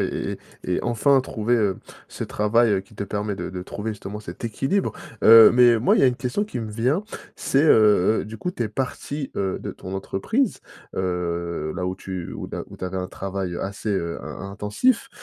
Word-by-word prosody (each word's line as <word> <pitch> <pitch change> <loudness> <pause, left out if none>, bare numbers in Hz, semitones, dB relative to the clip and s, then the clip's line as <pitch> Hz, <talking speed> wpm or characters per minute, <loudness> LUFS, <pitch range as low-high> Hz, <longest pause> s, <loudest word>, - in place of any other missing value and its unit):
et - - +2
et - - -3 0.3
et 90 - -2
et - - -5
enfin 130 +4 +3
trouver, 120 -1 -1
heu, 105 -5 +1 0.3
ce - - -5
travail, 115 +2 +2
heu, 95 - +2
qui 100 +2 -19
te 100 - -3
permet 105 -1 -3
de - - -4
de 90 -1 -6
trouver 110 +4 -4
justement 100 0 -7
cet 95 0 -9
équilibre. 135 - 0 0.3
Heu 115 0 +10
mais 120 -2 +6
moi 120 - +3
il - - +3
y - - +2
a 130 - +7
une 125 - -1
question 130 +11 -1
qui 205 - -6
me 110 -2 -4
vient, 125 - 0 0.3
c'est, 135 +2 +2
heu 110 - +5
heu, - - -7
du 110 +1 -9
coup 180 - -2
tu 120 -10 -3
es 110 - -3
parti, 135 +4 -4
heu, 95 -1 -1
de - - -5
ton 95 +1 -8
entreprise, 190 - -1 0.4
heu, 85 -3 -2
là 90 -1 -2
où 95 - -2
tu, 95 -2 -6
heu, - - -6
là - - -4
où - - -12
tu - - -6
avais 95 +1 -4
un 90 0 -2
travail, 95 -1 -4
heu, - - -4
assez, 100 +2 -5
heu, 85 -4 -1
in 100 0 -7
intensif 105 - +1
105 Hz, 230 wpm, -23 LUFS, 95-120 Hz, 0.4 s, Heu